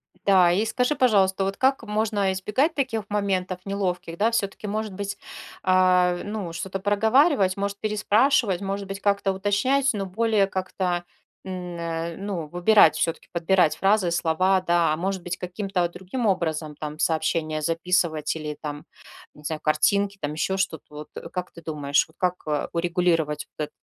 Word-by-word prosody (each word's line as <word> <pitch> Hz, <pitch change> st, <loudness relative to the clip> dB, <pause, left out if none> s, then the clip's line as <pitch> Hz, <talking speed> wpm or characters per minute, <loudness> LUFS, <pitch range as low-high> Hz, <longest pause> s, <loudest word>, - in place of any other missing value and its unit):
М-да. 185 Hz, -3 st, +4 dB
И 205 Hz, +5 st, +1 dB
скажи, 250 Hz, +6 st, 0 dB
пожалуйста, 195 Hz, -7 st, +3 dB
вот 195 Hz, +1 st, -2 dB
как 265 Hz, -2 st, +2 dB
можно 210 Hz, -2 st, 0 dB
избегать 255 Hz, -, 0 dB
таких 245 Hz, -6 st, -1 dB
моментов 190 Hz, -3 st, -1 dB
неловких, 180 Hz, -4 st, -3 dB
да? 225 Hz, +3 st, +2 dB
Всё-таки, 210 Hz, -1 st, -2 dB
может 215 Hz, -1 st, -3 dB
быть, 200 Hz, +1 st, -4 dB, 0.5 s
а, 180 Hz, -1 st, +4 dB
ну, 205 Hz, -5 st, -5 dB
что-то 190 Hz, +2 st, -4 dB
проговаривать, 205 Hz, -, +3 dB
может, 200 Hz, 0 st, -2 dB
переспрашивать, 215 Hz, -1 st, +2 dB
может 195 Hz, 0 st, -3 dB
быть, 195 Hz, 0 st, -5 dB
как-то 200 Hz, -1 st, +1 dB
уточнять, 205 Hz, +8 st, +1 dB
но 200 Hz, -2 st, -3 dB
более 210 Hz, +1 st, +1 dB
как-то, 185 Hz, -2 st, -2 dB, 0.4 s
н 190 Hz, -1 st, -6 dB, 0.3 s
э, 165 Hz, 0 st, -4 dB
ну, 195 Hz, -6 st, -4 dB
выбирать, 175 Hz, +6 st, +5 dB
всё-таки 165 Hz, -, -2 dB
подбирать 175 Hz, -1 st, +2 dB
фразы 195 Hz, -2 st, +2 dB
и -, -, -4 dB
слова, 185 Hz, +3 st, +2 dB
да? 170 Hz, -3 st, +2 dB
А -, -, -2 dB
может 190 Hz, 0 st, -2 dB
быть, 175 Hz, -1 st, -4 dB
каким-то, 185 Hz, 0 st, -2 dB
о, 175 Hz, -, 0 dB
другим 190 Hz, +8 st, -5 dB
образом 160 Hz, -5 st, -1 dB
там 150 Hz, 0 st, -7 dB
сообщения 160 Hz, -2 st, 0 dB
записывать 165 Hz, -2 st, 0 dB
или 150 Hz, -1 st, -4 dB
там, 145 Hz, -1 st, -6 dB, 0.5 s
не 150 Hz, -, -17 dB
знаю, 155 Hz, +1 st, -3 dB
картинки, 200 Hz, +6 st, +2 dB
там 145 Hz, +1 st, -2 dB
ещё 190 Hz, +5 st, -1 dB
что-то. 185 Hz, -5 st, -2 dB
Вот, 150 Hz, 0 st, -9 dB
э, -, -, -8 dB
как 180 Hz, -1 st, -5 dB
ты 170 Hz, -, -13 dB
думаешь, 145 Hz, -2 st, +1 dB
вот 160 Hz, -, -25 dB
как, 180 Hz, -1 st, +1 dB
э, 150 Hz, -1 st, -1 dB
урегулировать 170 Hz, -3 st, 0 dB
вот 150 Hz, -, -1 dB
эт -, -, -29 dB
190 Hz, 170 wpm, -24 LUFS, 170-205 Hz, 0.5 s, выбирать